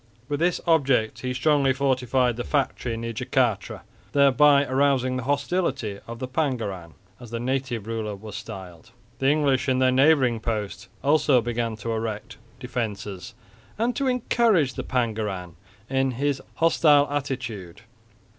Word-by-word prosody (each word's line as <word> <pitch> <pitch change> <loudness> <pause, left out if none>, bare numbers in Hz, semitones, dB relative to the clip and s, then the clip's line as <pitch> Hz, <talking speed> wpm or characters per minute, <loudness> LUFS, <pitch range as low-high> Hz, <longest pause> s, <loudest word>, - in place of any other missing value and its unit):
With 145 +1 -2
this 175 +1 +1
object 135 -9 +2
he 125 - -3
strongly 135 +1 +2
fortified 130 -2 +1
the 120 - -4
factory 130 -5 -1
near 115 0 -4
Jacatra, 125 -2 -1 0.3
thereby 140 0 +5
arousing 130 -1 +1
the 125 - -3
hostility 140 - -1
of 115 0 -7
the 130 - -5
Pangeran, 115 - -3 0.2
as 120 -2 -11
the 115 +1 -4
native 130 -3 -2
ruler 110 -2 -3
was 105 +1 -10
styled. 95 -2 -9 0.3
The 135 - +3
English 140 -3 +2
in 130 - +2
their 130 0 +3
neighbouring 130 -3 +4
post 105 -2 -4 0.2
also 145 -2 +4
began 120 -1 -2
to 115 +2 -5
erect 110 -1 -4 0.2
defences 105 -7 -5 0.4
and 235 +3 0
to 275 - 0
encourage 230 - +2
the - - -5
Pangeran 105 -8 -2 0.3
in 135 +1 +1
his 140 -1 0
hostile 150 -3 +4
attitude. 120 -10 -4
130 Hz, 140 wpm, -25 LUFS, 110-140 Hz, 0.4 s, thereby